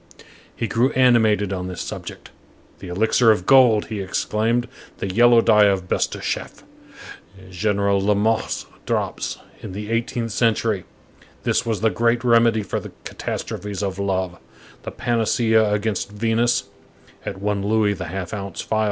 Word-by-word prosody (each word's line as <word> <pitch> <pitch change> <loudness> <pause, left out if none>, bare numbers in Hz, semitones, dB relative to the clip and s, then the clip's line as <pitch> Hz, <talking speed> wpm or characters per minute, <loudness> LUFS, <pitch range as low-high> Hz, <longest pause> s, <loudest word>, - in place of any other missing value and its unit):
He 115 - -2
grew 120 +4 +2
animated 110 -6 +3
on 90 -1 -4
this 90 -1 -6
subject: - - -7 0.5
"The 95 - -9
elixir 110 +6 +2
of 105 -5 +3
gold," 125 -5 +5
he 105 -3 -3
exclaimed, 110 +5 -1 0.3
"the 95 -1 -4
yellow 120 +2 +6
dye 105 -2 +5
of 95 -2 +1
Bestucheff, - - -3 0.9
General 100 +1 +1
Lamotte's 105 +2 0 0.2
drops, - - -2 0.2
in - - -7
the 105 +2 -6
eighteenth 115 0 -2
century,—this 110 -1 -2
was 110 -3 -1
the 110 0 +3
great 115 +1 +1
remedy 115 -2 +4
for - - -3
the - - -10
catastrophes 100 -1 -5
of 95 -1 -3
love, 95 -3 -2 0.4
the - - -6
panacea 110 -2 +1
against 105 -1 -1
Venus, 115 +3 +1 0.6
at - - -6
one 100 0 -1
louis 105 0 +2
the 90 -2 -6
half 90 +1 -5
ounce 100 -3 -6
phial. 110 - -1
105 Hz, 140 wpm, -22 LUFS, 100-115 Hz, 0.9 s, yellow